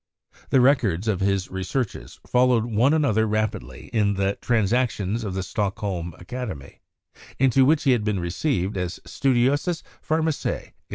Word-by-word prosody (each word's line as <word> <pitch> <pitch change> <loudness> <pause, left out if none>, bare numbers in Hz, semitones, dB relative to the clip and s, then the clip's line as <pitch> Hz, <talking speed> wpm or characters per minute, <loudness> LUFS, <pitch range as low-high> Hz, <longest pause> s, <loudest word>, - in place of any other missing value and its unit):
The 130 - +4
records 115 - +2
of 105 -4 +1
his 95 -1 0
researches 95 +5 -4
followed 125 -2 +3
one 120 +4 +2
another 125 -9 +2
rapidly 105 - -3
in 105 -3 +2
the 100 +1 0
'Transactions 115 -2 0
of 100 -3 -4
the 95 - -2
Stockholm 95 -4 -3
Academy, 90 - -7 0.6
into 130 0 +4
which 150 +2 +3
he 135 - +4
had 120 -4 +2
been 105 -3 0
received 95 - -1
as 90 -1 -3
"Studiosus 140 +6 +1 0.2
Pharmacia?" 160 -1 -1
110 Hz, 135 wpm, -24 LUFS, 95-130 Hz, 0.6 s, The